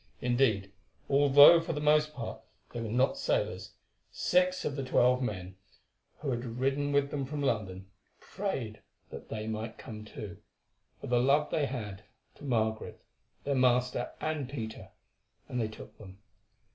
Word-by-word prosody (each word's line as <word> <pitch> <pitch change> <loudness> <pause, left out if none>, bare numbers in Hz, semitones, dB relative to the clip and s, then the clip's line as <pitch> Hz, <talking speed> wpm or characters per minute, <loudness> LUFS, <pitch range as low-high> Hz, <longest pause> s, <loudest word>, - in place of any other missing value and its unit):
Indeed, 120 -6 +1 0.4
although 145 +4 +8
for 165 - -3
the 150 - -3
most 150 0 +3
part 115 -4 -6 0.3
they 120 - -4
were 115 - -4
not 125 +4 +1
sailors, - - -1 0.4
six 180 0 +1
of 140 - -2
the 140 - -3
twelve 125 0 +3
men 95 -6 -4 0.6
who 145 -3 -3
had 120 -1 -2
ridden 135 +4 -1
with 140 0 +2
them 140 -2 -2
from 145 +2 -4
London 100 -7 -1 0.3
prayed 135 - -4 0.3
that - - -9
they 110 -1 -4
might 110 +1 -4
come 110 -4 -9
too, 105 -4 -8 0.6
for - - -8
the 120 0 +2
love 140 +4 +3
they 145 -3 +1
had 105 -7 -6 0.3
to - - -17
Margaret, 110 -5 -1 0.4
their 140 - 0
master, 125 -1 +2
and 155 -4 -2
Peter; 110 -6 -6 0.6
and 125 - -2
they 110 - 0
took 110 - -11
them. 95 -2 -12
125 Hz, 155 wpm, -30 LUFS, 110-145 Hz, 0.6 s, although